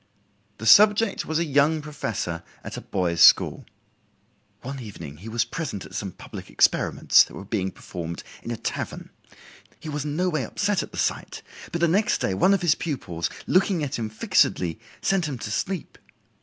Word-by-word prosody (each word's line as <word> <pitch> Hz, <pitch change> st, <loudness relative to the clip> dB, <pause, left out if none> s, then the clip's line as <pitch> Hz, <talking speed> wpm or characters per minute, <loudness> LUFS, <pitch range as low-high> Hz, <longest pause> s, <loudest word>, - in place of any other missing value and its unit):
The 110 Hz, -, -7 dB
subject 210 Hz, -, +5 dB
was 160 Hz, -, 0 dB
a 170 Hz, -, +1 dB
young 150 Hz, +2 st, +3 dB
professor 115 Hz, -, -4 dB, 0.2 s
at -, -, -7 dB
a -, -, -6 dB
boys' 85 Hz, -3 st, -1 dB
school. -, -, +6 dB, 1.0 s
"One 135 Hz, +2 st, -5 dB
evening 85 Hz, -, -9 dB
he 100 Hz, +8 st, -9 dB
was 115 Hz, +1 st, 0 dB
present 120 Hz, -, -5 dB
at -, -, -13 dB
some 100 Hz, -1 st, -4 dB
public -, -, -10 dB
experiments -, -, +4 dB
that -, -, -13 dB
were 100 Hz, -, -8 dB
being 100 Hz, -2 st, -1 dB
performed 85 Hz, -2 st, -7 dB, 0.2 s
in -, -, -8 dB
a 120 Hz, -, -3 dB
tavern; -, -, -5 dB, 0.7 s
he 155 Hz, -, -8 dB
was 150 Hz, -1 st, -3 dB
in 150 Hz, -1 st, -3 dB
no 180 Hz, +3 st, +1 dB
way 155 Hz, -6 st, -1 dB
upset 200 Hz, -, 0 dB
at -, -, -7 dB
the -, -, -9 dB
sight, -, -, -2 dB, 0.3 s
but 170 Hz, -, -3 dB
the 170 Hz, -, +5 dB
next 200 Hz, +6 st, +2 dB
day 95 Hz, -, 0 dB
one 190 Hz, -, +4 dB
of 190 Hz, -, -3 dB
his 170 Hz, -3 st, +5 dB
pupils, 105 Hz, -, -3 dB, 0.2 s
looking 185 Hz, -3 st, +2 dB
at 140 Hz, -3 st, -3 dB
him 110 Hz, -2 st, -3 dB
fixedly, 90 Hz, -4 st, +1 dB, 0.2 s
sent 190 Hz, -4 st, +1 dB
him 140 Hz, -4 st, -4 dB
to 105 Hz, -, -6 dB
sleep. 180 Hz, -, -3 dB
135 Hz, 185 wpm, -25 LUFS, -, 1.0 s, school